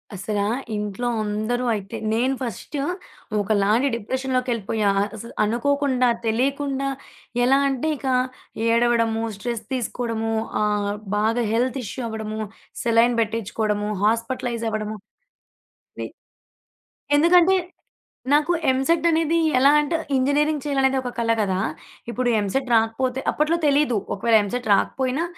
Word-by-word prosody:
అసల 205 +3 -3 0.4
ఇంట్లో 210 +3 -3 0.2
అందరూ 215 +4 -1
అయితే 200 -3 -5 0.2
నేను 250 +4 +1
ఫస్ట్ 245 +4 -5 0.7
ఒకలాంటి 210 +5 +2
డిప్రెషన్‌లోకి 255 +3 -2
వెళ్లిపోయా. 215 -2 0 0.3
అసలు 230 +2 -9
అనుకోకుండా, 255 +3 +1 0.2
తెలియకుండా 275 +4 0 0.5
ఎలా 265 +2 +5
అంటే 270 +3 -2
ఇక 270 - -6 0.6
ఏడవడము, 230 -1 +2 0.2
స్ట్రెస్ 235 0 -4
తీసుకోవడము, 230 -2 -2 0.3
ఆహ్, 210 -1 +1 0.3
బాగా 225 +3 +1
హెల్త్ 250 +3 0
ఇష్యూ 250 +5 -5
అవ్వడము, 220 0 -4 0.4
సెలైన్ 235 +1 +4
పెట్టించుకోవడము, 210 -1 -1
హాస్పిటలైజ్ 230 +1 0
అవ్వడము, 215 0 -3 1.0
ని - - -3 1.1
ఎందుకంటే 350 +4 +5 0.7
నాకు 300 +4 +4 0.2
ఎంసెట్ 270 +6 +2
అనేది 330 0 +2 0.2
ఎలా 270 +2 +6
అంటే 295 +3 -1 0.2
ఇంజినీరింగ్ 285 +2 +1
చేయాలనేది 270 -2 +1
ఒక 250 - -4
కల 230 -1 +1
కదా! 190 -3 0 0.5
ఇప్పుడు 245 +1 0
ఎంసెట్ 210 +7 -1
రాకపోతే 230 +3 +1
అప్పట్లో 310 +3 +1
తెలీదు. 285 -5 +3 0.2
ఒకవేళ 225 +3 +2
ఎంసెట్ 245 +4 -4
రాకపోయినా, 260 +8 0
240 Hz, 110 wpm, -23 LUFS, 220-270 Hz, 1.1 s, ఎలా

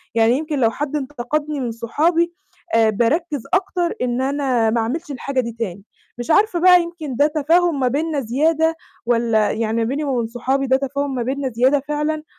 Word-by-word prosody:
يعني 230 +3 +4
يمكن 305 -2 -3
لو 225 -2 +3
حد 295 +2 -4
انتقدني 295 +1 -3
من 240 -3 -2
صحابي، 325 +9 0 0.4
آآ، 225 -1 +4
باركّز 280 - 0
أكتر 365 -2 0
إن 250 0 0
أنا 265 -4 +1
ما 230 +1 +1
أعملش 295 +8 -3
الحاجة 275 0 -3
دي 235 -1 -5
تاني. 195 -3 -4 0.3
مش 240 +6 -3
عارفة 405 0 +3
بقى 360 0 +7
يمكن 325 -6 -6
ده 290 +3 +4
تفاهم 320 +1 +2
ما 255 - +2
بيننا 300 +3 -1
زيادة، 315 +7 +1 0.3
والَّا 230 -3 +2
يعني 225 0 -1
ما 230 - +1
بيني 275 +6 -2
وما 270 -3 -1
بين 230 - -1
صحابي 265 +3 -1
ده 265 +1 +4
تفاهم 280 0 -3
ما 245 - -1
بيننا 265 +2 -2
زيادة 255 +5 +2
فعلًا، 300 +1 -2
275 Hz, 190 wpm, -20 LUFS, 240-310 Hz, 0.4 s, بقى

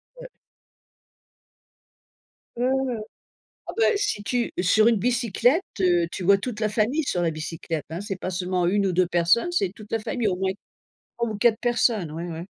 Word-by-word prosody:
Ouais. - - -10 2.3
Mmh 240 - -2 0.3
mh. - - -6 0.7
Ah - - -4
bah, 455 - +3
si 405 - -1
tu 245 +2 -1
sur 215 +5 +4
une 235 - +5
bicyclette, 245 - +2 0.2
heu, 175 -2 +3
tu 185 - -6
vois 200 +2 +5
toute 220 +1 -5
la 215 - +1
famille 240 +9 +1
sur 180 -9 -1
la 165 -1 +1
bicyclette, 160 0 -5
hein. 165 +2 -5
C'est 205 -1 -4
pas 185 - -5
seulement 180 -1 -1
1 200 +2 +2
ou 180 - -1
2 180 0 +3
personnes, 175 - +2
c'est 195 - 0
toute 215 -1 -13
la 225 - 0
famille, 230 +1 -2
au 180 - -2
moins 190 0 0 0.7
3 235 -1 -1
ou 215 - -4
4 235 0 +3
personnes. 230 -8 +1
Ouais, 165 +2 -5
ouais. 170 0 -6
205 Hz, 185 wpm, -24 LUFS, 175-235 Hz, 2.3 s, une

